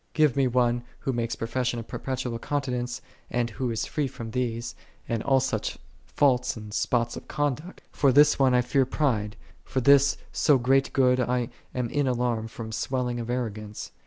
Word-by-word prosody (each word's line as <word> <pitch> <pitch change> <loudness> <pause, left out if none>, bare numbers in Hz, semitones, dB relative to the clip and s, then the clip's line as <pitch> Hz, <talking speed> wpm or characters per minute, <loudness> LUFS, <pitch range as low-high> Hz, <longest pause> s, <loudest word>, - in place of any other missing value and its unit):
Give 155 -5 +3
me 135 -2 +3
one 120 -1 +1 0.2
who 135 - -1
makes 115 -1 -1
profession 120 +2 -2
of 115 - -6
perpetual 130 -3 -3
continence, 125 -3 -2 0.3
and 120 -1 -1
who 125 +4 -2
is 115 -1 -1
free 150 -2 -1
from 115 -3 -7
these, 120 -1 -2 0.3
and 115 -1 -1
all 135 +1 +3
such 125 -5 -2 0.3
faults 125 -4 +2
and 105 -1 -9
spots 120 +1 0
of - - -9
conduct; 145 +4 -3
for 140 -2 +3
this 145 +3 +5
one 130 -2 +4
I 125 - +5
fear 130 +1 +1
pride, 110 -8 0 0.3
for 130 - -2
this 140 +2 +5
so 145 - +4
great 135 +2 +2
good 125 -1 +3
I 125 -1 0 0.3
am 125 -2 0
in 145 -2 +1
alarm 120 -3 0
from 115 0 -7
the - - -7
swelling 125 0 -1
of 115 0 -5
arrogance. 110 -4 -4
125 Hz, 185 wpm, -26 LUFS, 115-135 Hz, 0.3 s, this